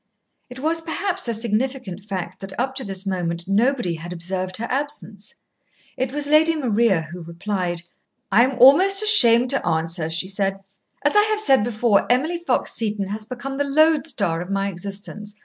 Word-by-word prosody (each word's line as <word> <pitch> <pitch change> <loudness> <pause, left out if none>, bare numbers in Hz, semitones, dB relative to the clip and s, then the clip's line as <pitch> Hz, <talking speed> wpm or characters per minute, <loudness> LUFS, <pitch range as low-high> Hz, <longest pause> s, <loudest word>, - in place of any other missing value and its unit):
It 250 +1 -10
was 325 +4 0
perhaps 365 +1 -2
a 235 - -1
significant 230 -2 -2
fact 185 -2 -6
that 195 +2 -8
up 265 +2 -1
to 265 0 -1
this 195 -2 -5
moment 175 -3 -2
nobody 225 -1 +1
had 165 +2 -8
observed 185 +2 -4
her 230 - -4
absence. 235 - -4 0.6
It 260 0 -2
was 290 +1 -2
Lady 310 +3 +4
Maria 230 - +1
who 170 +3 -10
replied. 175 +1 -4 0.5
"I 220 +5 +6
am 260 0 -1
almost 375 - +6
ashamed 250 - +5
to 275 - -1
answer," 165 0 -1
she 165 +3 +1
said. 195 0 -1 0.5
"As 290 - +2
I 415 - +7
have 430 0 0
said 270 - +4
before, 225 -1 +1
Emily 315 +8 +1
Fox 345 - -1
Seton 210 -3 -1
has 215 +1 -5
become 265 +3 -6
the - - +2
lodestar 280 - +2
of 180 - -7
my 195 0 -1
existence. 200 +3 -8
220 Hz, 175 wpm, -22 LUFS, 190-275 Hz, 0.6 s, I